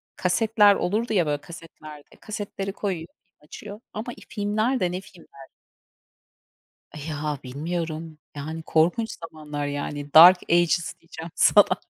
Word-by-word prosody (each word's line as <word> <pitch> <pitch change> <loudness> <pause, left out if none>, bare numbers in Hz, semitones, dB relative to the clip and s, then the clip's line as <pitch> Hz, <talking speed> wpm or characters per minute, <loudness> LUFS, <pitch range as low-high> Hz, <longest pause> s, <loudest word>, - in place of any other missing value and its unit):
kasetler 210 +2 +4
olurdu 220 +6 -1
ya 180 -4 +3
böyle 145 -1 -2
kasetlerde, 155 -3 -12
kasetleri 200 -2 -5
koyuyor, 180 -6 -4 0.2
film - - -48
açıyor 205 +5 -9
ama, 230 +3 -5
iii, - - -15
filmler 215 +4 0
de 175 -1 0
ne 185 +1 -4
filmler? 160 -8 -16 1.4
Eh, 150 0 -7
ya, 150 -1 -3
bilmiyorum. 160 +3 -5 0.2
Yani, 160 +3 -5
korkunç 175 +10 +1
zamanlar, 150 -3 -6
yani, 145 0 -5
dark 180 +3 +10
ages 175 0 +2
diyeceğim 165 0 -10
sana. 200 -3 +5
170 Hz, 130 wpm, -24 LUFS, 155-205 Hz, 1.4 s, dark